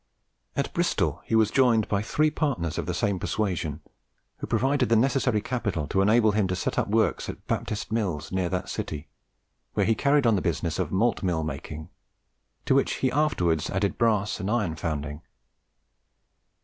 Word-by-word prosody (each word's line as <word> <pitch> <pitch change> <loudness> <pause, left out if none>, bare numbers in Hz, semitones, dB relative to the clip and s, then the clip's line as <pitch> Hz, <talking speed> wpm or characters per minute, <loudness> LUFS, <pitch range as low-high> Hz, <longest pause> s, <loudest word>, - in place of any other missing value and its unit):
At - - -2
Bristol - - 0
he - - 0
was 110 -1 +4
joined 120 -5 +3
by 100 -1 0
three 155 +8 +1
partners 115 - -1
of - - -4
the - - -1
same 100 -3 0
persuasion, 85 -9 -2 0.6
who - - -6
provided 135 -1 +1
the 115 - +4
necessary 125 -2 +2
capital 105 - -2
to 95 - +2
enable 110 +2 +4
him 105 -2 +1
to 90 - -1
set 95 - -1
up - - 0
works 110 +1 +1
at - - -8
Baptist 105 -1 -3
Mills, 100 -9 -2
near 95 -2 0
that 90 +1 -2
city, 75 0 -5 0.7
where - - +2
he 115 - +3
carried 140 +4 +2
on 115 -2 +4
the 95 - 0
business 85 0 -1
of 90 -4 -1
malt 115 +5 +1
mill 85 -4 0
making, 75 +1 -6 0.8
to - - +3
which 135 - +2
he 130 - 0
afterwards 90 - +1
added 95 +1 -1
brass 110 -4 +1
and 95 0 -3
iron 105 -8 0
founding. 75 -2 -4
105 Hz, 175 wpm, -26 LUFS, 85-115 Hz, 0.8 s, was